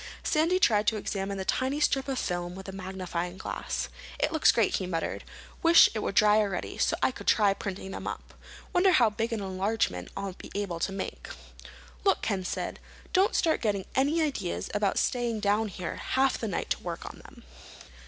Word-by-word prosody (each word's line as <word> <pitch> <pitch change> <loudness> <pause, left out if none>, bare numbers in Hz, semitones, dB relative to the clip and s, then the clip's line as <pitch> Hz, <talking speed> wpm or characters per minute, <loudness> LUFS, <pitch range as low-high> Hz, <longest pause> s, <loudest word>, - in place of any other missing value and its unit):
Sandy 330 +4 +2
tried 215 - +3
to 220 - +3
examine 195 -1 -3
the 190 - -4
tiny 265 +7 0
strip 270 -2 +2
of 270 -1 -2
film 175 -3 -2
with 190 +1 -9
a - - -5
magnifying 185 -2 -4
glass. - - -3 0.3
"It 295 - +1
looks 315 -2 +5
great," 225 -4 +2
he 185 - -3
muttered. 165 -2 -3 0.4
"Wish 335 0 +7
it 220 - -2
were - - -1
dry 210 +1 +5
already, 200 -4 -2
so - - +2
I - - +4
could - - -11
try 205 -3 +4
printing 195 -1 -6
them - - -6
up. - - -6 0.4
Wonder 370 +1 +5
how 230 -4 +5
big 225 +3 -2
an 225 -2 -2
enlargement 190 - -1
I'll 195 -1 -3
be - - -11
able 195 -5 -2
to 195 - -1
make." 195 0 -5 0.8
"Look," 390 - +2
Ken 195 -4 -1
said, 180 - -4 0.3
"don't 390 +5 +3
start 325 -2 +2
getting 200 -4 0
any 290 +5 +2
ideas 235 - -2
about 205 -2 +1
staying 240 -3 0
down 210 +1 +2
here 180 -3 -5
half 265 0 +1
the 225 - -2
night 195 - -3
to - - +1
work - - -5
on - - -9
them. - - -15
210 Hz, 195 wpm, -28 LUFS, 190-260 Hz, 0.8 s, Wish